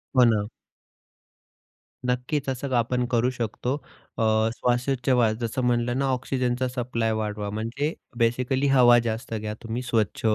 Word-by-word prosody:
हो 125 - +7
ना. 105 -3 +2 1.6
नक्कीच 125 +4 -1
असं 130 +1 -3
आपण 125 +1 +1
करू 120 +1 +3
शकतो 125 +1 -2 0.4
अ, 115 - +1 0.3
श्वासोच्छवास 125 -2 +1
जसं 120 +2 -2
म्हटलं 120 0 +1
ना, 140 - +1
ऑक्सिजनचा 130 -1 0
सप्लाय 115 -3 -1
वाढवा 105 -1 -3
म्हणजे 115 +9 -2 0.2
बेसिकली 125 +4 +1
हवा 125 -3 +6
जास्त 115 +2 -4
घ्या 105 -1 -3
तुम्ही 115 +2 -3
स्वच्छ, 115 -5 0
120 Hz, 130 wpm, -25 LUFS, 115-130 Hz, 1.6 s, हो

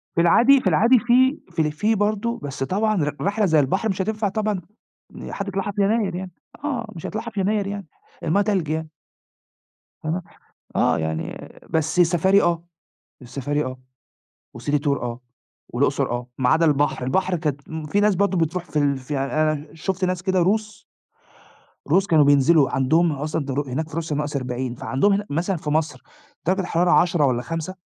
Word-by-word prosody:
في 170 - +3
العادي 245 +11 +5
في 195 - -1
العادي 230 +9 +5
في 255 +4 +3
في 165 - 0
ال 150 -1 +1
في 210 +8 +1
برضه، 215 +3 -1
بس 140 -1 -4
طبعًا 215 +7 0
ر 145 0 -2
رحلة 205 +2 +1
زي 160 -4 +4
البحر 190 +11 +1
مش 190 -1 -1
هتنفع 215 +1 -1
طبعًا 210 -2 -1 0.5
إن - - -8
حد 200 - -4
يطلعها 195 +1 -2
في 200 - -1
يناير 200 -2 +1
يعني، 185 0 -5 0.3
آه، 255 -6 -2
مش 165 - -8
هيطلعها 220 +2 -4
في 215 -3 -5
يناير 200 +1 0
يعني، 200 -1 -5 0.4
المَيّة 170 +6 +2
تلج 195 -7 0
يعني. 160 0 -2 1.2
آه، 165 +4 -1 0.5
آه - - +3
يعني 80 0 -4 0.2
بس 160 +2 0
السفاري 180 +3 +4
آه، 170 -1 +1 0.6
السفاري 140 +4 -2
آه 130 0 -6 0.8
وcity 145 0 0
tour - - +3
آه 120 0 -4 0.5
والأقصر - - 0
آه، 120 0 -3
ما 130 -2 +2
عدا 165 +3 +4
البحر، 145 -3 +1
البحر 185 +8 0
كانت 150 -4 -3
م 160 -1 -5
في 200 +7 +1
ناس 210 -1 +3
برضه 195 0 +1
بتروح 165 +2 -1
في 155 - -3
ال 140 -1 +2
في 130 +3 -6
يعني 135 0 -2
أنا 155 -1 -1
شُفت 185 +3 -2
ناس 185 -1 -1
كده 190 -1 +1
روس 210 +3 0 1.0
روس 195 +1 +3
كانوا 155 -6 +5
بينزلوا، 145 0 +5
عندهم 160 +6 +2
ال 145 -1 -4
أصلًا 155 -1 -2
در 135 0 -2
هناك 155 +5 -2
في - - -9
روسيا 160 -2 -2
-40 130 -4 -3
فعندهم 135 +11 +1
هنا 205 +1 -1
مثلًا 175 +6 -1
في 150 - -5
مصر 155 0 -1 0.5
درجة 190 +2 +2
الحرارة 175 0 +1
10 175 -4 +4
والّا 125 -3 +1
5 165 +6 -5
170 Hz, 185 wpm, -22 LUFS, 145-200 Hz, 1.2 s, العادي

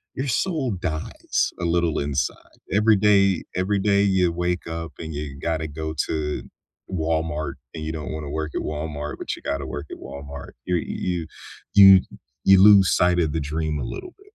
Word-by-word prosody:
your 135 - -2
soul 140 - 0
dies 85 -4 -2
a 85 - -2
little 85 -2 +1
inside 70 -2 -3
every 105 +2 +4
day 100 -2 +4
every 95 +3 +1
day 100 0 +3
you 95 -3 +3
wake 90 +1 -2
up 85 0 -5
and 80 -1 -6
you 70 -1 -5
gotta 80 0 -2
go 80 +1 -5
to 75 -1 -2 0.5
Walmart 80 -3 -1 0.2
and 80 - -5
you 80 - -2
don't 75 -1 -5
wanna 75 -2 -5
work 80 0 -3
at - - -1
Walmart, 75 -1 -4
but - - -3
you - - -14
gotta 70 -1 -3
work 75 +1 -5
at - - -6
Walmart, 70 0 -9
you're 90 -2 +1
y - - -5
you 85 -3 -3 0.5
you 95 -2 +9 0.4
you 95 -1 +7
lose 100 -2 +7
sight 90 0 +3
of 80 -4 +1
the 80 - 0
dream 75 +1 -2
a - - -3
little 370 -1 -6
bit. 400 - -21
80 Hz, 190 wpm, -23 LUFS, 75-95 Hz, 0.5 s, you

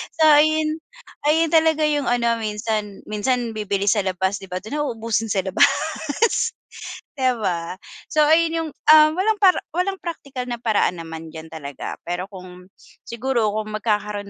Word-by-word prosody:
So 320 - +2
ayun, 310 +1 +4 0.5
ayun 320 +1 +3
talaga 320 -1 +3
yung 295 -3 +1
ano 235 -1 +1
minsan. 210 -2 -3
Minsan, 235 +3 -1
bibili 205 -2 -2
sa 215 - +3
labas, 190 +1 -1
'di 195 - -11
ba? 185 0 -5
Dun 280 +8 -4
na 295 - 0
uubusin 225 -2 -2
sa 200 -3 0
labas, 190 0 +4 1.5
'di 260 -1 +3
ba? 175 -3 -2 0.4
So, 305 - +4
ayun 325 +2 +4
yung, 325 -1 -2 0.2
ah, 310 0 +8
walang 410 +5 +1
para 375 -2 +5 0.2
walang 385 +2 0
praktikal 280 -7 -6
na 240 -1 -4
paraan 205 -6 +1
naman 165 0 -8
diyan 160 0 -9
talaga. 145 -3 -6
Pero 175 +1 -2
kung 180 -1 -12 0.4
siguro, 235 -2 0
kung 215 0 -4
magkakaroon 210 -2 -2
225 Hz, 160 wpm, -22 LUFS, 195-305 Hz, 1.5 s, ah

